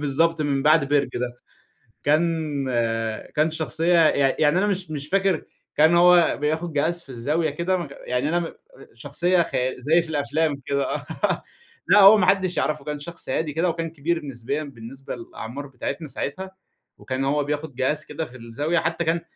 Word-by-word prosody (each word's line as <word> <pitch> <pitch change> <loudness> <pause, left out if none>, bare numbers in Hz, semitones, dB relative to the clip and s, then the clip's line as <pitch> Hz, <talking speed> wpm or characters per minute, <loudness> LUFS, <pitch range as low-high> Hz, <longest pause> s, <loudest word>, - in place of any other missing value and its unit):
بالضبط 155 +3 +1
من 140 -2 0
بعد 150 -2 +4
بِرج 145 -1 +2
ده، 120 0 -3 0.7
كان 155 -2 +1 0.7
كان 155 +1 +2
شخصية 160 +2 0
يع 140 -2 +2
يعني 150 +3 +4
أنا 205 +3 +2
مش 185 -5 -2
مش 145 -1 -5
فاكر 195 -1 +1 0.3
كان 160 +3 +5
هو 175 -1 +5
بياخد 160 +2 -1
جهاز 165 +4 0
في - - -22
الزاوية 150 +7 -1
كده 170 +5 -1
م 170 -4 -4 0.2
يعني 125 +4 -1
أنا 175 +2 +1
م 170 - -5 0.4
شخصية 170 +9 +1
خيا 130 -4 -2
زي 160 +7 +3
في 165 - -11
الأفلام 145 0 -1
كده، 140 0 0
آه - - -6 0.8
لأ - - +6
هو 200 +2 +9
ما 185 - +3
حدّش 185 -3 +2
يعرفه، 155 - -1
كان 150 -1 -4
شخص 170 +3 -9
هادي 150 +2 -1
كده 170 +3 +1
وكان 165 0 -3
كبير 165 +1 -2
نسبيًا 135 +3 -4
بالنسبة 135 0 -9
للأعمار 120 +3 -8
بتاعتنا 140 +4 -5
ساعتها، 165 +8 -5 0.5
وكان 130 +1 -3
هو 145 +1 +1
بياخد 145 -1 -4
جهاز 150 +4 -1
كده 155 +2 -4
في 130 - -13
الزاوية، 140 +9 -1
حتى 165 +1 -1
كان 165 +1 +1
150 Hz, 175 wpm, -23 LUFS, 140-170 Hz, 0.8 s, هو